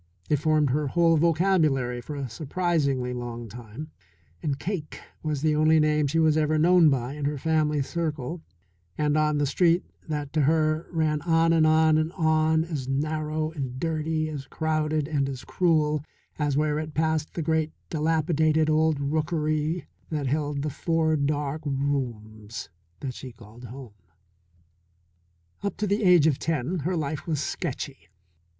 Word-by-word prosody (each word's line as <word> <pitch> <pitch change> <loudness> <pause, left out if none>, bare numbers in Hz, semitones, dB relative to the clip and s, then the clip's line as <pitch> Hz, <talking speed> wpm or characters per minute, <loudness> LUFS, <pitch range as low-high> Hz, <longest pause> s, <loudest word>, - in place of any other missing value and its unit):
It 150 - +4
formed 150 -1 +2
her 150 +2 0
whole 165 +3 +3
vocabulary 155 -7 +2
for 145 +5 -7
a 140 -2 -3
surprisingly 140 -2 -1
long 120 -1 -5
time, 120 +7 -9 0.5
and 140 -3 -1
Cake 165 -1 -4 0.2
was 150 -2 -2
the 155 -1 +3
only 155 +1 +4
name 150 -1 +2
she 155 +4 -1
was 160 -1 +4
ever 155 0 +2
known 170 0 +6
by 130 -1 -1
in 145 -1 -4
her 145 0 -1
family 150 -1 +1
circle 160 0 -3 0.6
and 150 -1 +1
on 150 -1 +2
the 145 - +2
street 170 +4 +3 0.3
that 145 -2 -3
to 155 - +2
her 155 +2 +2
ran 155 -3 0
on 165 0 +3
and 160 -1 +4
on 155 0 +4
and 155 +1 -1
on 160 -1 +2
as 150 -6 -4
narrow 155 +2 -1
and 130 -5 -5
dirty, 160 0 -1
as 145 -3 -6
crowded 155 -1 -1
and 140 -3 0
as 130 -2 -6
cruel 155 -4 +1 0.4
as 145 -2 +1
where 150 0 +1
it 155 -1 -6
passed 155 -1 0
the 165 - -2
great 160 0 +1 0.2
dilapidated 155 0 +2
old 155 -1 +2
rookery 155 +2 -1 0.2
that 150 -3 -2
held 145 +1 -1
the 150 - -2
four 160 +1 +1
dark 145 0 -1
rooms 115 - -3 0.3
that 135 -3 -4
she 130 +1 -8
called 115 +1 -14
home. 125 -2 -10 1.7
Up 200 - -3
to 210 - -1
the 205 +2 0
age 180 -5 +6
of 150 -4 +2
ten 165 +2 -1
her 175 +5 -1
life 150 0 -3
was 155 -4 0
sketchy. 140 -3 -4
155 Hz, 160 wpm, -26 LUFS, 140-160 Hz, 1.7 s, known